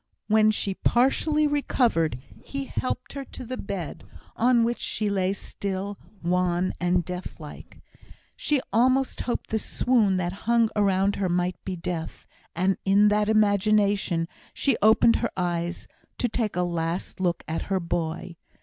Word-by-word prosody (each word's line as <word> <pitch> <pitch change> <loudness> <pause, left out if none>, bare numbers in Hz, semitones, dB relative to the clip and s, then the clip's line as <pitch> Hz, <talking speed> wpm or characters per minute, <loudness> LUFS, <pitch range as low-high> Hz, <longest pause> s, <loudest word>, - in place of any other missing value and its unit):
When 215 0 +4
she 205 -2 0
partially 285 +8 +2
recovered, 240 - +1 0.3
he 275 0 -5
helped 255 -1 -3
her 275 -1 -5
to 255 - -10
the 255 +2 -4
bed, 195 -8 -5 0.3
on 240 0 +4
which 235 +1 0
she 210 -2 -1
lay 190 -1 +1
still, 200 0 -4 0.2
wan 180 +1 +1
and 180 -1 +1
death 180 0 -6
like. 150 -2 -11 0.6
She 295 -3 +1
almost 255 +4 +2
hoped 245 - -3
the 220 - +1
swoon 215 -5 +2
that 175 0 -1 0.2
hung 235 -2 +4
around 200 -1 +2
her 190 -2 0
might 180 +1 -1
be 190 - -4
Death, 170 -2 -5 0.3
and 185 +3 +1
in 200 +2 +5
that 210 0 +2
imagination 205 -4 +2 0.3
she 275 -4 +2
opened 220 +2 +5
her 235 - -1
eyes 175 -1 -2 0.3
to 245 - +1
take 220 -3 -2
a 180 - +1
last 170 +2 -3
look 175 -2 0
at 160 +1 -2
her 190 -1 +1
boy. 170 0 -3
200 Hz, 150 wpm, -26 LUFS, 180-230 Hz, 0.6 s, in